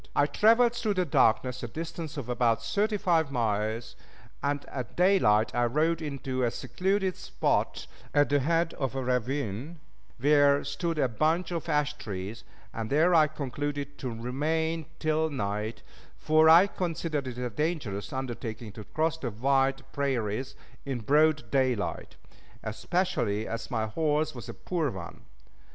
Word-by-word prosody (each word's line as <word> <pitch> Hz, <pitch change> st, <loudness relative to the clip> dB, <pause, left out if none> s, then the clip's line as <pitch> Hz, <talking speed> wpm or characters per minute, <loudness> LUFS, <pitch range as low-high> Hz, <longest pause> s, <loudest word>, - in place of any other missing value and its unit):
I 145 Hz, -, +4 dB
traveled 230 Hz, +10 st, +4 dB
through 220 Hz, -4 st, -1 dB
the 185 Hz, -1 st, +1 dB
darkness 125 Hz, -3 st, +2 dB
a 120 Hz, -, -4 dB
distance 160 Hz, +3 st, -6 dB
of 135 Hz, -5 st, -4 dB
about 115 Hz, -2 st, +1 dB
thirty 205 Hz, -, 0 dB
five 165 Hz, -6 st, +2 dB
miles, 110 Hz, -2 st, -1 dB, 0.5 s
and 145 Hz, 0 st, -1 dB
at 125 Hz, -3 st, -7 dB
daylight 175 Hz, -, +4 dB
I 120 Hz, 0 st, +2 dB
rode 155 Hz, +7 st, +1 dB
into 135 Hz, -3 st, -3 dB
a 120 Hz, -, +3 dB
secluded 190 Hz, -, -1 dB
spot -, -, -1 dB, 0.3 s
at 145 Hz, 0 st, +3 dB
the 145 Hz, 0 st, +3 dB
head 165 Hz, +4 st, +1 dB
of 135 Hz, -1 st, -2 dB
a 135 Hz, -, -2 dB
ravine 125 Hz, -, -2 dB, 0.4 s
where 145 Hz, +1 st, +4 dB
stood 155 Hz, +4 st, -2 dB
a 140 Hz, -, +3 dB
bunch 160 Hz, +9 st, 0 dB
of 170 Hz, -1 st, -3 dB
ash 150 Hz, -1 st, +1 dB
trees, 105 Hz, +2 st, -6 dB, 0.3 s
and 110 Hz, -1 st, -4 dB
there 160 Hz, +5 st, +4 dB
I 155 Hz, -2 st, +6 dB
concluded 145 Hz, 0 st, -4 dB
to 130 Hz, -, -3 dB
remain 155 Hz, +7 st, -1 dB
till 155 Hz, 0 st, +1 dB
night, 105 Hz, -4 st, -3 dB, 0.3 s
for 155 Hz, +1 st, +4 dB
I 170 Hz, +4 st, +9 dB
considered 165 Hz, -7 st, -3 dB
it 125 Hz, -1 st, -6 dB
a 125 Hz, -1 st, -3 dB
dangerous 145 Hz, -, -2 dB
undertaking 120 Hz, -4 st, -5 dB
to 105 Hz, +1 st, -9 dB
cross 160 Hz, +1 st, -1 dB
the 130 Hz, -, -2 dB
wide 135 Hz, +4 st, +1 dB
prairies 130 Hz, -1 st, -1 dB, 0.3 s
in 135 Hz, -4 st, -3 dB
broad 150 Hz, -1 st, +3 dB
daylight 130 Hz, -6 st, 0 dB, 0.5 s
especially 110 Hz, -, -1 dB
as 115 Hz, 0 st, -5 dB
my 115 Hz, -4 st, 0 dB
horse 155 Hz, +6 st, 0 dB
was 120 Hz, -3 st, -9 dB
a -, -, -6 dB
poor 165 Hz, -5 st, -1 dB
one. 95 Hz, -7 st, -8 dB
140 Hz, 150 wpm, -28 LUFS, 120-160 Hz, 0.5 s, I